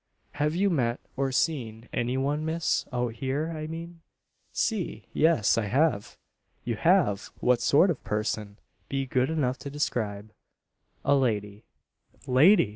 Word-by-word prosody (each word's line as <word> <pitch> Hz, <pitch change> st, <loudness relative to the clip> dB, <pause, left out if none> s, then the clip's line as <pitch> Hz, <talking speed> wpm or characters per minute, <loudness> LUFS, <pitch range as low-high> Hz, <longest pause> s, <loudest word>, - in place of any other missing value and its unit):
"Have 150 Hz, +2 st, -1 dB
you 195 Hz, +2 st, +2 dB
met, 120 Hz, -6 st, 0 dB, 0.2 s
or 135 Hz, 0 st, 0 dB
seen, 125 Hz, -6 st, -1 dB
any 125 Hz, +2 st, 0 dB
one, 145 Hz, +3 st, 0 dB
miss 160 Hz, +1 st, 0 dB
out 120 Hz, -2 st, -1 dB
here, 140 Hz, +6 st, -2 dB
I 155 Hz, 0 st, -5 dB
mean?" 165 Hz, +1 st, -8 dB, 0.5 s
"Si 215 Hz, -7 st, -2 dB
yes 155 Hz, -10 st, +3 dB
I 110 Hz, -, -1 dB
have." 130 Hz, -3 st, +1 dB, 0.5 s
"You 115 Hz, -, -2 dB
have! 165 Hz, -, +2 dB
What 125 Hz, -1 st, +2 dB
sort 165 Hz, +9 st, +5 dB
of 150 Hz, -, -6 dB
person? 105 Hz, -1 st, -2 dB, 0.3 s
Be 135 Hz, -1 st, -1 dB
good 130 Hz, +1 st, +1 dB
enough 140 Hz, -5 st, 0 dB
to 140 Hz, -, -6 dB
describe 110 Hz, -7 st, -2 dB, 0.4 s
" -, -, -40 dB
"A 140 Hz, -, +4 dB
lady." 105 Hz, -5 st, -1 dB, 0.6 s
"Lady!" 135 Hz, -, +5 dB
135 Hz, 145 wpm, -27 LUFS, 115-160 Hz, 0.6 s, sort